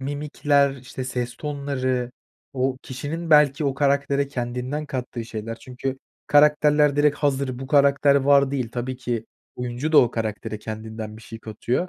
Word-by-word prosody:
mimikler, 145 Hz, 0 st, +1 dB
işte, 130 Hz, 0 st, -7 dB
ses 125 Hz, -1 st, -3 dB
tonları, 130 Hz, -4 st, -2 dB, 0.4 s
o 130 Hz, -1 st, 0 dB
kişinin 150 Hz, +6 st, -5 dB
belki 150 Hz, -1 st, +5 dB
o 135 Hz, -2 st, 0 dB
karaktere 140 Hz, 0 st, +1 dB
kendinden 125 Hz, +3 st, -3 dB
kattığı 125 Hz, -3 st, -4 dB
şeyler. 115 Hz, 0 st, -6 dB
Çünkü 130 Hz, +1 st, -5 dB, 0.3 s
karakterler 150 Hz, 0 st, +4 dB
direkt 145 Hz, 0 st, +3 dB
hazır, 135 Hz, -3 st, 0 dB
"Bu 135 Hz, -, -6 dB
karakter 140 Hz, 0 st, +4 dB
var." 140 Hz, 0 st, +4 dB
değil. 130 Hz, -4 st, -2 dB
Tabii 125 Hz, +1 st, -3 dB
ki 120 Hz, -3 st, -3 dB, 0.3 s
oyuncu 125 Hz, +5 st, -3 dB
da 150 Hz, -, +8 dB
o 120 Hz, -, +5 dB
karaktere 110 Hz, -1 st, -4 dB
kendinden 110 Hz, 0 st, -7 dB
bir 110 Hz, -, -13 dB
şey 115 Hz, -, -9 dB
katıyor, 120 Hz, +10 st, -2 dB
135 Hz, 150 wpm, -23 LUFS, 125-145 Hz, 0.4 s, da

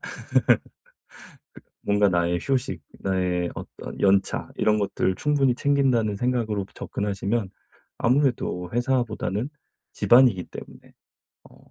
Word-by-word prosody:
그 -, -, -7 dB, 1.7 s
뭔가 105 Hz, 0 st, +3 dB
나의 85 Hz, 0 st, +1 dB
휴식, 130 Hz, -, -1 dB, 0.2 s
나의 90 Hz, -2 st, 0 dB
어떤 -, -, -9 dB
연차 100 Hz, 0 st, +2 dB
이런 105 Hz, 0 st, +2 dB
것들을 95 Hz, -2 st, 0 dB
충분히 135 Hz, -1 st, +2 dB
챙긴다는 130 Hz, -7 st, +2 dB
생각으로 110 Hz, -4 st, -1 dB
접근하시면 100 Hz, +1 st, -2 dB, 0.5 s
아무래도 120 Hz, -9 st, +1 dB
회사보다는 120 Hz, -1 st, -1 dB, 0.4 s
집안이기 120 Hz, -7 st, +5 dB
때문에 -, -, -12 dB, 0.6 s
어 -, -, -19 dB
105 Hz, 260 characters per minute, -24 LUFS, 95-125 Hz, 1.7 s, 집안이기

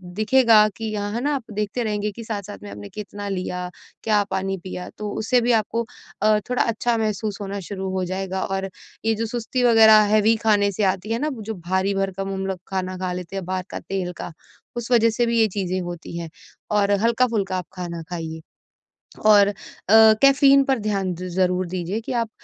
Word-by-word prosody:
दिखेगा 220 Hz, 0 st, +5 dB
कि 225 Hz, -, -5 dB
यहाँ 205 Hz, -1 st, -3 dB
है 235 Hz, -, -2 dB
ना, 290 Hz, +3 st, 0 dB
आप 265 Hz, -, -4 dB
देखते 210 Hz, +3 st, -2 dB
रहेंगे 210 Hz, -1 st, -2 dB
कि 230 Hz, +3 st, -9 dB
साथ-साथ 205 Hz, -2 st, -5 dB
में 105 Hz, -, -8 dB
आपने 100 Hz, 0 st, -9 dB
कितना 205 Hz, -1 st, -7 dB
लिया, 180 Hz, -1 st, -3 dB, 0.3 s
क्या 210 Hz, -2 st, +3 dB
पानी 190 Hz, 0 st, -1 dB
पिया, 180 Hz, -1 st, -6 dB
तो 210 Hz, -1 st, -4 dB
उससे 245 Hz, +3 st, +2 dB
भी 240 Hz, +1 st, +2 dB
आपको 230 Hz, +1 st, +1 dB, 0.4 s
अ, 215 Hz, 0 st, +4 dB
थोड़ा 250 Hz, -, +1 dB
अच्छा 230 Hz, +1 st, 0 dB
महसूस 215 Hz, -1 st, -2 dB
होना 200 Hz, 0 st, -4 dB
शुरू 190 Hz, -2 st, -4 dB
हो 185 Hz, -, 0 dB
जाएगा। 190 Hz, +1 st, -3 dB
और 195 Hz, 0 st, -3 dB, 0.4 s
ये 225 Hz, 0 st, +2 dB
जो 225 Hz, +2 st, -2 dB
सुस्ती 240 Hz, +2 st, -2 dB
वगैरह 220 Hz, -2 st, +7 dB
हैवी 215 Hz, +1 st, +4 dB
खाने 205 Hz, -2 st, +3 dB
से 210 Hz, -, -1 dB
आती 195 Hz, +2 st, 0 dB
है 230 Hz, -, -1 dB
ना, 300 Hz, +3 st, 0 dB
जो 220 Hz, -2 st, -6 dB
भारी-भरकम 195 Hz, +1 st, -2 dB
हम 190 Hz, 0 st, -3 dB
लोग 190 Hz, -2 st, -3 dB
खाना 185 Hz, -1 st, -3 dB
खा 185 Hz, 0 st, -3 dB
लेते 180 Hz, +1 st, -7 dB
हैं, 190 Hz, -, -4 dB
बाहर 185 Hz, 0 st, -2 dB
का -, -, -4 dB
तेल 190 Hz, -2 st, -4 dB
का, -, -, -6 dB, 0.5 s
उस 240 Hz, +1 st, -5 dB
वजह 230 Hz, -1 st, +5 dB
से 240 Hz, +2 st, +1 dB
भी 235 Hz, 0 st, +1 dB
ये 220 Hz, -, +5 dB
चीज़ें 185 Hz, -1 st, -1 dB
होती 175 Hz, -1 st, -7 dB
हैं, 165 Hz, -1 st, -6 dB, 0.4 s
और 205 Hz, -1 st, +2 dB
हल्का-फुल्का 225 Hz, -5 st, +1 dB
आप 180 Hz, -, -5 dB
खाना 175 Hz, -3 st, -6 dB
खाइए। 160 Hz, -2 st, -5 dB, 0.8 s
और 205 Hz, -2 st, +7 dB
अ, 205 Hz, -, -1 dB, 0.4 s
कैफीन 275 Hz, +6 st, +6 dB
पर 270 Hz, -2 st, 0 dB
ध्यान 200 Hz, -3 st, -1 dB
द 180 Hz, +2 st, -6 dB
ज़रूर 180 Hz, 0 st, +1 dB
दीजिए 185 Hz, +3 st, -3 dB
कि 225 Hz, -, -7 dB
आप 230 Hz, -2 st, 0 dB
205 Hz, 200 wpm, -22 LUFS, 185-225 Hz, 0.8 s, वगैरह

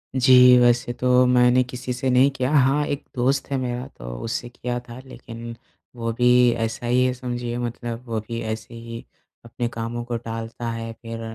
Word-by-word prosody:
जी, 125 Hz, -1 st, +7 dB
वैसे 120 Hz, 0 st, +3 dB
तो 125 Hz, 0 st, +4 dB
मैंने 125 Hz, 0 st, +4 dB
किसी 125 Hz, 0 st, -5 dB
से 130 Hz, +2 st, -2 dB
नहीं 130 Hz, +2 st, +5 dB
किया। 130 Hz, +1 st, -1 dB
हाँ, 145 Hz, 0 st, +3 dB
एक 145 Hz, 0 st, -3 dB
दोस्त 130 Hz, +3 st, 0 dB
है 135 Hz, -, +1 dB
मेरा 125 Hz, -1 st, -3 dB
तो -, -, -10 dB, 0.2 s
उससे 115 Hz, +1 st, -3 dB
किया 120 Hz, 0 st, -4 dB
था। 120 Hz, -, -9 dB
लेकिन 115 Hz, -2 st, -9 dB, 0.4 s
वो 115 Hz, -1 st, -2 dB
भी 125 Hz, +1 st, +3 dB, 0.3 s
ऐसा 115 Hz, +1 st, -3 dB
ही 125 Hz, +1 st, +3 dB
है, 125 Hz, -, +1 dB
समझिए 120 Hz, -1 st, -4 dB
मतलब 120 Hz, 0 st, -5 dB
वो 115 Hz, -1 st, -2 dB
भी 115 Hz, -1 st, -4 dB
ऐसे 110 Hz, +1 st, -5 dB
ही, 115 Hz, 0 st, -8 dB, 0.4 s
अपने 120 Hz, +1 st, -3 dB
कामों 115 Hz, +1 st, -4 dB
को 120 Hz, -1 st, -3 dB
टालता 115 Hz, 0 st, -6 dB
है। 115 Hz, 0 st, -5 dB
फिर 115 Hz, 0 st, -7 dB
120 Hz, 185 wpm, -23 LUFS, 115-125 Hz, 0.4 s, जी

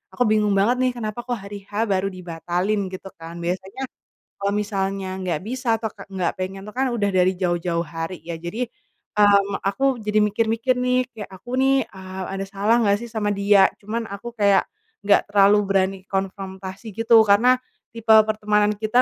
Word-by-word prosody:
aku 245 Hz, -, +2 dB
bingung 210 Hz, -2 st, +3 dB
banget 225 Hz, +6 st, +3 dB
nih 255 Hz, 0 st, +2 dB
kenapa 230 Hz, 0 st, -5 dB
kok 245 Hz, -, 0 dB
hari 200 Hz, -2 st, -9 dB
H -, -, -22 dB, 0.2 s
baru 190 Hz, 0 st, +1 dB
dibatalin 185 Hz, +2 st, -2 dB
gitu 190 Hz, +1 st, -7 dB
kan, 165 Hz, +1 st, -9 dB
biasanya, 190 Hz, +8 st, -4 dB, 0.6 s
kalau 200 Hz, 0 st, 0 dB
misalnya 195 Hz, -2 st, -2 dB
nggak 175 Hz, -5 st, -2 dB
bisa 240 Hz, 0 st, 0 dB
atau 220 Hz, 0 st, -2 dB
ka 200 Hz, -3 st, -13 dB
nggak 190 Hz, -3 st, -2 dB
pengen 190 Hz, +1 st, -4 dB
tuh -, -, -7 dB
kan 265 Hz, +1 st, +1 dB
udah 205 Hz, -3 st, +1 dB
dari 185 Hz, 0 st, +3 dB
jauh-jauh 175 Hz, -2 st, -1 dB
hari 165 Hz, +2 st, -6 dB
ya. 165 Hz, 0 st, -5 dB
Jadi, 175 Hz, +9 st, -3 dB, 0.6 s
mmm, 200 Hz, -1 st, +4 dB
aku 260 Hz, +5 st, +1 dB
jadi 210 Hz, 0 st, +1 dB
mikir-mikir 225 Hz, +4 st, +1 dB
nih, 250 Hz, 0 st, +2 dB
kayak 210 Hz, -3 st, -7 dB
aku 245 Hz, +7 st, -6 dB
nih, 270 Hz, -1 st, +3 dB
eee, 190 Hz, 0 st, -8 dB
ada 195 Hz, 0 st, -3 dB
salah 200 Hz, +3 st, +1 dB
nggak 200 Hz, -1 st, +3 dB
sih 235 Hz, -, -8 dB
sama 215 Hz, -2 st, -1 dB
dia. 200 Hz, -1 st, +5 dB
Cuman 225 Hz, +3 st, -3 dB
aku 205 Hz, +4 st, -7 dB
kayak, 200 Hz, -2 st, +4 dB, 0.4 s
nggak 200 Hz, 0 st, +3 dB
terlalu 200 Hz, 0 st, +6 dB
berani 195 Hz, 0 st, +1 dB
konfrontasi 195 Hz, +1 st, -5 dB
gitu, 225 Hz, 0 st, +5 dB
karena, 245 Hz, +6 st, +5 dB, 0.4 s
tipe 230 Hz, -1 st, -10 dB, 0.2 s
pertemanan 210 Hz, -1 st, +2 dB
kita 220 Hz, +3 st, +3 dB
200 Hz, 175 wpm, -22 LUFS, 190-225 Hz, 0.6 s, terlalu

